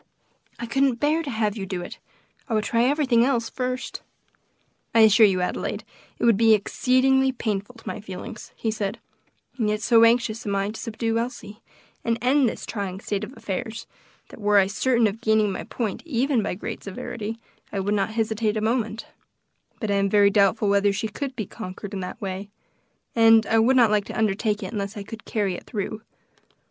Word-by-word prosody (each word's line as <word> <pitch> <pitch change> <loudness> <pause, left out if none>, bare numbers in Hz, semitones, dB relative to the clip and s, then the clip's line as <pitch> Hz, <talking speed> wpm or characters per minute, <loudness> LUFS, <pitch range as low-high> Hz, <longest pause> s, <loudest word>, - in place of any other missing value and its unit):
I 235 - -5
couldn't 270 +2 +2
bear 305 +4 +2
to 305 - -5
have 220 -4 0
you 195 -3 -5
do 185 -2 -4
it. - - -9 0.5
I 225 - 0
would 215 - +1
try 230 +2 +2
everything 265 -4 +3
else 240 -3 0
first." 255 0 -3 0.9
"I 225 - +7
assure 220 0 +7
you, 185 -2 0
Adelaide, 180 - -2 0.3
it - - -1
would 230 -4 +5
be 225 0 +6
exceedingly 265 +5 +2
painful 215 -2 -3
to 225 - -15
my - - -4
feelings," 215 +4 -8
he 220 - -2
said, 205 -2 -3 0.6
"and 215 -2 +1
yet 210 0 0
so 230 +2 +5
anxious 230 -1 +3
am 200 -1 -2
I 195 +1 0
to 220 - -9
subdue 230 0 -1
Elsie, 230 -3 -6 0.4
and 230 -1 0
end 255 +1 +3
this - - -7
trying 195 -4 -4
state 205 0 -3
of 240 +4 -8
affairs, 225 +1 -5 0.4
that - - -12
were 205 0 +4
I 195 - +6
certain 235 +4 +1
of 215 +2 -1
gaining 220 -2 +3
my - - -5
point, 220 -5 -3
even 265 -4 +1
by 195 - -2
great 190 - -6
severity, 215 +3 -5 0.3
I 200 - -2
would 200 +2 0
not 200 -1 +1
hesitate 220 -1 -1
a - - +1
moment, 225 0 -1 0.7
but 215 -3 -2
I 200 - +2
am 195 0 +2
very 200 0 +5
doubtful 205 +1 +3
whether 200 0 +3
she 210 +2 -2
could 265 +5 -5
be 215 - -3
conquered 195 0 -8
in 195 - -3
that 185 +4 -6
way, 195 -1 -5 0.7
and 225 -1 +6
I 225 - +3
would 245 +4 +4
not 235 -4 +5
like 210 -1 +2
to - - -7
undertake 210 0 0
it 190 - -6
unless 200 0 -4
I 205 - -5
could 220 +2 -10
carry 205 -4 -1
it - - -8
through. 215 -1 -4
220 Hz, 200 wpm, -24 LUFS, 205-235 Hz, 0.9 s, I